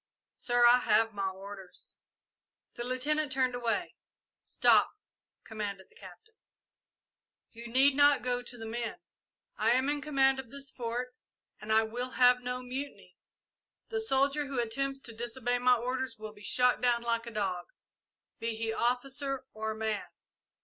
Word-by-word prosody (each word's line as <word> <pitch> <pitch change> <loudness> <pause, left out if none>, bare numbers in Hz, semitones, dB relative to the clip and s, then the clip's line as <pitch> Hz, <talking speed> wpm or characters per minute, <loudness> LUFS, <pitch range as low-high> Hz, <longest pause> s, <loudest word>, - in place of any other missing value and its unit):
"Sir, 240 0 +3
I 245 +1 +7
have 225 -1 +2
my 195 -1 -1
orders." 195 0 -11 0.8
The 240 - -5
Lieutenant 275 +4 +1
turned 260 -1 +1
away. 240 -2 -1 0.5
"Stop!" - - +4 0.5
commanded 205 -3 -6
the - - -27
Captain. 440 0 -14 1.2
"You 235 0 -10
need 265 +3 +4
not 285 0 +5
go 245 0 -1
to 245 0 -6
the 225 - -7
men. 235 +7 -4 0.6
I 225 +2 +3
am 260 +2 +2
in 290 0 -1
command 270 -2 +2
of 255 -3 -7
this 275 +1 -5
Fort 245 +1 -4 0.5
and 215 +1 -6
I 220 0 +5
will 245 +3 -4
have 250 0 +6
no 250 0 -4
mutiny. 265 +3 -7 0.7
The 445 -1 -1
soldier 280 -5 +2
who 270 -2 -3
attempts 270 +4 -2
to 235 - -7
disobey 240 +1 -2
my 250 0 +5
orders 250 0 -3
will 215 0 -8
be 205 - -17
shot 250 +4 +3
down 240 -1 +2
like 230 0 -1
a - - -6
dog, 190 -5 -2 0.7
be 230 0 -2
he 225 0 -2
officer 265 +3 -1
or 220 0 -3
man. 220 -1 -2
245 Hz, 155 wpm, -30 LUFS, 225-265 Hz, 1.2 s, I